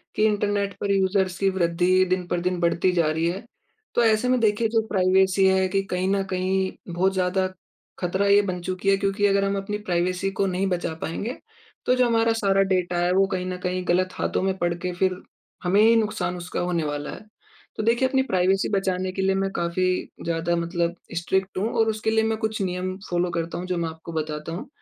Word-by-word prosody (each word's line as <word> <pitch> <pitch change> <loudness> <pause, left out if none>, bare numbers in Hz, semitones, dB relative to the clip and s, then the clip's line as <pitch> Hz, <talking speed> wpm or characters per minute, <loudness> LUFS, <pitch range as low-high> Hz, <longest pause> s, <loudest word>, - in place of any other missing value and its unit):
कि 215 - +3
इंटरनेट 205 -1 0
पर 200 - 0
यूज़र्स 190 -1 +1
की 195 - +3
वृद्धि 185 0 +2
दिन 185 0 0
पर 175 0 -1
दिन 180 0 -1
बढ़ती 170 +1 +2
जा 170 -3 +2
रही 160 +1 -1
है। 180 +4 -3 0.5
तो 240 - +4
ऐसे 220 +1 +3
में 255 -1 +3
देखिए, 220 0 +2
जो 225 0 +2
प्राइवेसी 190 -1 +3
है 190 0 +3
कि 195 +1 +1
कहीं 185 -1 -2
न 195 - 0
कहीं 190 +1 0 0.2
बहुत 190 +3 +2
ज़्यादा 185 0 +1 0.5
खतरा 190 +3 0
ये 200 +1 +6
बन 185 -3 -3
चुकी 185 +2 -2
है 195 - +4
क्योंकि 195 +1 0
अगर 200 0 +2
हम 200 0 0
अपनी 200 +1 -3
प्राइवेसी 180 +2 0
को 200 - +3
नहीं 190 +1 0
बचा 175 -3 -2
पाएँगे, 215 - -4 0.5
तो 250 - +3
जो 250 0 +3
हमारा 230 -1 +2
सारा 195 -3 +2
डेटा 180 -1 +1
है, 175 +1 +2
वो 195 +1 +4
कहीं 185 -1 -3
न 185 0 -3
कहीं 180 0 -1
गलत 185 +1 +2
हाथों - - -1
में 190 0 0
पड़ 175 -1 0
के 180 +1 -4
फिर 185 +1 0 0.4
हमें 190 +3 +3
ही 225 +1 +6
नुकसान 210 -4 0
उसका 175 0 -5
होने 175 -2 0
वाला 145 -1 -3
है। - - -10 0.5
तो - - -1
देखिए, 235 +4 +3
अपनी 265 0 +2
प्राइवेसी 190 -4 +1
बचाने 185 -2 0
के 190 - -3
लिए 190 0 +2
मैं 195 0 0
काफ़ी 175 0 -1 0.4
ज़्यादा 170 +1 0
मतलब 170 0 -1 0.2
स्ट्रिक्ट 190 +3 -1
हूँ, 205 +4 0
और 225 -1 +1
उसके 220 0 -1
लिए 220 0 +3
मैं 220 0 0
कुछ 220 -1 -2
नियम 185 0 -2
फॉलो 175 0 0
करता 165 0 -3
हूँ 180 - -4
जो 180 -1 -1
मैं 165 -1 -1
आपको 160 +1 -10
बताता 155 0 -4
हूँ। 185 +11 -6
185 Hz, 220 wpm, -24 LUFS, 180-200 Hz, 0.5 s, ये